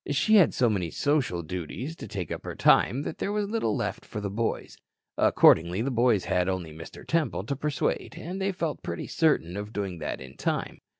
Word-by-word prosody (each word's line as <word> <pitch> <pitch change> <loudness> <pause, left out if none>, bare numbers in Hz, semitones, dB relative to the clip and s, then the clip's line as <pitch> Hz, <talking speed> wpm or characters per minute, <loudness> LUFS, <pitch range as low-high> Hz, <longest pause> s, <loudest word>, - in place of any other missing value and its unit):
She 215 +10 +4
had 185 - +6
so 125 - +3
many 95 -6 0
social 125 - 0
duties 90 - -5
to - - -8
take 95 -6 -5
up - - -4
her - - -6
time 135 +4 +4
that - - -5
there 200 - -1
was 210 -1 -1
little 225 -8 0
left 110 -6 -3
for 105 - -6
the 100 -1 -3
boys. 115 +3 -2 0.4
Accordingly, 90 +6 +4
the 135 - -1
boys 120 -4 +2
had 90 +1 +1
only 90 -4 -3
Mr. 80 +1 -10
Temple 165 -2 0
to 140 - -3
persuade 145 +1 -2
and 185 +4 -5
they 195 +1 +1
felt 170 -5 -3
pretty 85 - -4
certain 145 - +1
of 105 +1 -5
doing 95 -5 -4
that - - -4
in 65 0 -11
time. - - -2
115 Hz, 205 wpm, -27 LUFS, 90-150 Hz, 0.4 s, had